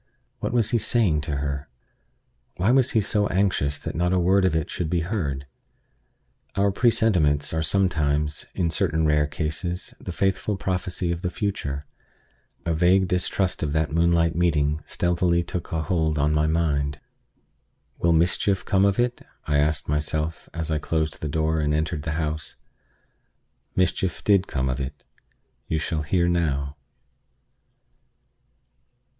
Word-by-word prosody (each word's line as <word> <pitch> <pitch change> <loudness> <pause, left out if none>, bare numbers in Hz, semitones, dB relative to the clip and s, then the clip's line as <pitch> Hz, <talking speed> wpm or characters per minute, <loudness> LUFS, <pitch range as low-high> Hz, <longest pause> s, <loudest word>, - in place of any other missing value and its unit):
What - - -2
was 115 -3 +1
he 120 - +3
saying 100 -11 +2
to 70 - 0
her? 70 +1 -3 0.9
Why 95 +6 +2
was 130 -1 +4
he 110 - +4
so 105 0 +1
anxious 95 -7 +1
that - - -5
not 90 +2 +1
a - - +3
word 95 +2 +3
of 90 -4 +2
it 80 -2 0
should 85 -3 -3
be 85 0 +1
heard? 80 -8 -2 1.1
Our 100 0 +2
presentiments 90 - +2
are 80 - 0
sometimes, 75 -4 0
in 85 -2 0
certain 80 0 +1
rare 75 -1 +3
cases, 80 +4 -3
the 95 - -6
faithful 95 +2 0
prophecy 90 -2 -2
of 85 0 -3
the 90 - -1
future. 75 -8 -3 0.8
A 85 - +1
vague 90 +3 +3
distrust 90 +1 0
of 75 -3 -1
that 80 0 0
moonlight 85 0 +2
meeting 75 -3 +1
stealthily 85 0 +1
took 85 0 -5
a 80 -1 -1
hold 80 -1 0
on 75 +1 +2
my 75 0 +2
mind. 75 -3 0 1.0
"Will 85 - +3
mischief 90 +4 +2
come 95 0 +3
of 100 -1 +2
it?" 120 0 0 0.2
I 75 - +1
asked 75 0 +1
myself 75 +2 -2
as 80 -1 -4
I 75 - +1
closed 80 0 -2
the 75 - -2
door 80 +1 0
and 75 0 +1
entered 80 0 -1
the 80 +1 -3
house. 80 -1 -3 1.2
Mischief 90 -1 0
did 100 -2 +3
come 65 -1 -1
of 65 +2 -1
it. 70 +2 -6 0.6
You 80 - 0
shall 80 0 -1
hear 85 +3 +1
how. 75 -5 0
80 Hz, 150 wpm, -24 LUFS, 75-95 Hz, 1.2 s, was